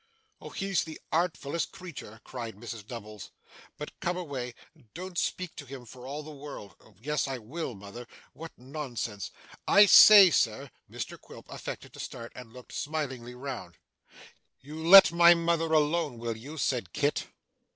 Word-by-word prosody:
'Oh, - - -9
he's 195 -2 -1
the 160 -1 -9
artfullest 165 -2 -1
creetur!' 135 - -10
cried 120 -4 -7
Mrs 105 0 -9
Nubbles. 110 -4 -9 0.5
'But 150 - -9
come 180 -1 -2
away. 135 -8 -5 0.4
Don't 185 +1 -7
speak 185 -1 -2
to 145 - -8
him 130 -1 -9
for 130 +5 -8
the 155 - -10
world.' 140 -8 -10 0.2
'Yes 150 +4 -1
I 135 -1 -3
will, 125 +3 -6
mother. 100 +5 -10 0.3
What 165 +1 -9
nonsense. 125 - -5 0.4
I 205 +1 +8
say, 200 -2 +9
sir 130 +1 0
' - - -43
Mr - - -7
Quilp - - -14
affected - - -8
to - - -13
start, 115 0 -7
and 125 -3 -11
looked 125 +1 -13
smilingly 130 -6 -4
round. 125 -10 -7 0.8
'You 150 +4 -9
let 190 +3 +9
my 170 0 +7
mother 165 -1 0
alone, 155 -3 +1
will 115 0 -4
you?' 140 +8 -10
said 130 -3 -1
Kit. 145 0 0
140 Hz, 155 wpm, -29 LUFS, 120-165 Hz, 0.8 s, say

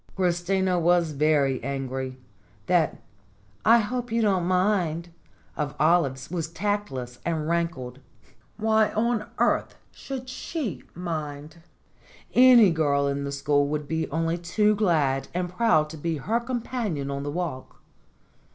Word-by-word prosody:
Christina 180 0 +1
was 170 -1 +3
very 140 -3 +1
angry. 130 -1 -4 0.5
That 175 -4 +1 0.6
"I 230 +2 +7
hope 245 +2 -2
you 230 - +1
don't 190 -4 +2
mind" 180 -3 +1 0.5
of 145 -1 -3
Olive's 150 -4 +2
was 170 -3 -2
tactless 165 -10 -3
and 160 -2 -2
rankled. 165 -7 -2 0.6
Why 220 0 +2
on 225 0 0
earth - - +1 0.2
should 260 -2 -7
she 250 - -4
mind? 155 -3 -5 0.8
Any 245 -6 +7
girl 145 -3 +1
in 140 0 -2
the 140 - -4
school 145 +1 +1
would 150 0 -3
be 160 +1 -2
only 165 +3 -1
too 210 +5 +2
glad 155 -10 +1
and 180 0 -1
proud 180 -6 +2
to 160 - -8
be 160 +1 -2
her 220 - 0
companion 235 - -3
on 140 0 -3
the 145 - -4
walk. 155 -5 -5
170 Hz, 135 wpm, -25 LUFS, 145-205 Hz, 0.8 s, I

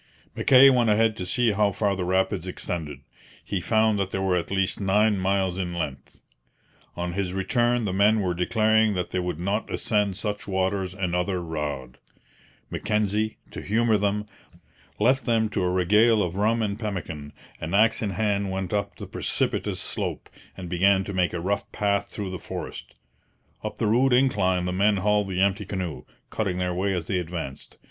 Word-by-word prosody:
Mackay 135 +1 +7
went 120 -3 +3
ahead 110 +1 +3
to 90 - -4
see 120 +2 +2
how 105 0 +2
far 100 -2 0
the 95 - -3
rapids 95 -1 0
extended. 80 -6 -5 0.4
He 100 -3 -2
found 110 +1 +2
that 95 -1 -1
they 95 - -3
were 95 -1 +1
at 85 - -2
least 95 +1 -1
nine 105 +1 +3
miles 95 -1 0
in 90 -2 -3
length. 70 -5 -5 0.8
On 90 0 -3
his 95 -1 -2
return 120 +4 +1
the 95 - -2
men 105 +3 +4
were 90 -3 0
declaring 110 +3 +2
that 90 -1 -3
they 90 - -1
would 90 -3 -3
not 100 +5 -2
ascend 105 -3 0
such 105 +2 -4
waters 95 -1 -1
another 90 0 -1
rod. 75 -6 -5 0.7
Mackenzie, 105 0 -1
to - - -7
humour 115 +2 +2
them, 105 0 0 0.7
left 130 +5 +3
them 110 -2 +2
to 100 - -2
a 90 - +1
regale 105 +5 +4
of 90 0 -3
rum 110 +3 +1
and 105 0 -2
pemmican, 85 -9 -5 0.3
and 80 +4 -3
axe 115 +2 +4
in 105 - -1
hand 100 0 0
went 95 -1 -3
up 100 -1 -1
the - - -8
precipitous - - -1
slope, - - -3 0.3
and 90 - -6
began 95 +3 +3
to 100 - -6
make 90 -2 +1
a 90 - -3
rough 100 +3 -2
path 100 -1 0
through 100 -3 -5
the 95 - -5
forest. - - -7 0.7
Up - - -5
the - - -1
rude 125 +5 +3
incline 95 -9 +2
the 90 - -2
men 100 +2 +3
hauled 105 +1 +1
the 95 0 -1
empty 100 +1 +2
canoe, 90 -5 -5 0.3
cutting 100 -5 -1
their 90 -1 -1
way 95 +3 0
as 90 -4 -2
they 95 +1 -1
advanced. 80 -6 -6
100 Hz, 185 wpm, -25 LUFS, 90-105 Hz, 0.8 s, Mackay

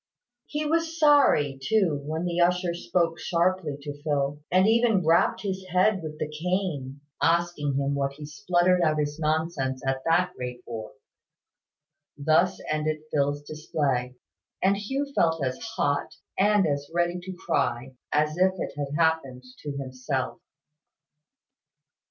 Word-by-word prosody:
He 300 +1 -3
was 330 +1 0
sorry 275 - +4
too 170 -4 +1
when 160 +3 -2
the 175 0 -1
usher 180 0 +2
spoke 170 -1 0
sharply 170 -3 0
to 145 0 -7
Phil, 145 -1 -1
and 185 +2 +5
even 225 -5 +3
rapped 165 +5 +3
his 190 -2 -3
head 185 +2 +3
with 155 -1 -7
the - - -2
cane, 150 -4 -3 0.2
asking 165 -3 +1
him 140 0 0
what 140 -1 -1
he 150 +1 -9
spluttered 175 +4 +2
out 155 -2 +2
his 150 +1 -2
nonsense 155 -4 -1
at 135 0 -1
that 180 +2 +2
rate 125 -1 -6
for. 110 -2 -7 1.2
Thus 160 +5 +2
ended 155 0 -1
Phil's 145 0 +1
display; 145 -5 -2 0.4
and 195 +1 +3
Hugh 265 +8 -2
felt 165 -6 +2
as 130 0 -3 0.2
hot, 145 0 0 0.2
and 205 0 +4
as 145 -2 -2
ready 175 +1 0
to 185 +1 -7
cry, 130 -6 -1 0.2
as 150 +2 +1
if 185 0 +4
it - - -4
had 145 0 -4
happened 160 -6 +1 0.2
to 145 - -5
himself. 130 0 -3
155 Hz, 140 wpm, -26 LUFS, 145-180 Hz, 1.2 s, and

